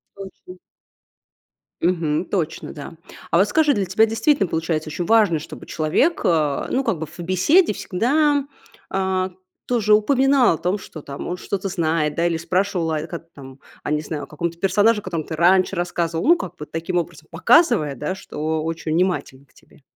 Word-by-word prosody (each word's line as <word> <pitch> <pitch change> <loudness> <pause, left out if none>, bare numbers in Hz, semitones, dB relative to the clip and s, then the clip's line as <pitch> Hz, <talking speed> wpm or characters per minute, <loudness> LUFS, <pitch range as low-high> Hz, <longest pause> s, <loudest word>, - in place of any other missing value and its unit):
Точно. 190 -2 -11 1.2
Мгм. 165 -2 0
Точно. 165 -4 -3
Да. 145 +1 -9 0.4
А - - +4
вот 195 +4 +4
скажи, 305 +3 +3
для 200 -5 0
тебя 190 +5 +3
действительно 225 +2 +1
получается 160 -1 -2
ещё 170 +3 -4
важно, 210 -6 +4
чтобы 155 - -10
человек, 165 - +1
а, 150 -4 +1
ну 265 - +1
как 190 - 0
бы, 160 - -3
в 155 - -16
беседе 185 - +3
всегда, 285 +10 +1 0.4
а, 190 -1 -1 0.3
тоже 220 -4 +2
упоминал 265 +1 +4
о - - -8
том, 180 +5 -1
что 165 -5 -10
там, 140 -1 -8
он 180 - -3
что-то 195 +1 -3
знает. 160 -4 0
Да? 170 - 0
Или 165 -1 -1
спрашивал: 180 0 -1
"О, 155 0 -2
как 170 -1 -7
там?" 135 -1 -12 0.2
А, - - -3
не 150 0 +1
знаю, 155 -1 -5
о - - -9
каком-то 170 +2 -4
персонаже, 210 +4 +3
о - - -27
котором 170 -4 -3
ты 160 - -6
раньше 180 +3 +3
рассказывал. 170 -2 -2
Ну 340 - +7
как - - -7
бы, 150 - -7
таким 165 +4 -3
образом, 170 - -4
показывая, 235 - +3
да, 150 +8 -3
что 155 -3 -3
очень 160 -1 -3
внимателен 165 -6 -1
к - - -32
тебе. - - -23
175 Hz, 185 wpm, -21 LUFS, 160-205 Hz, 1.2 s, Ну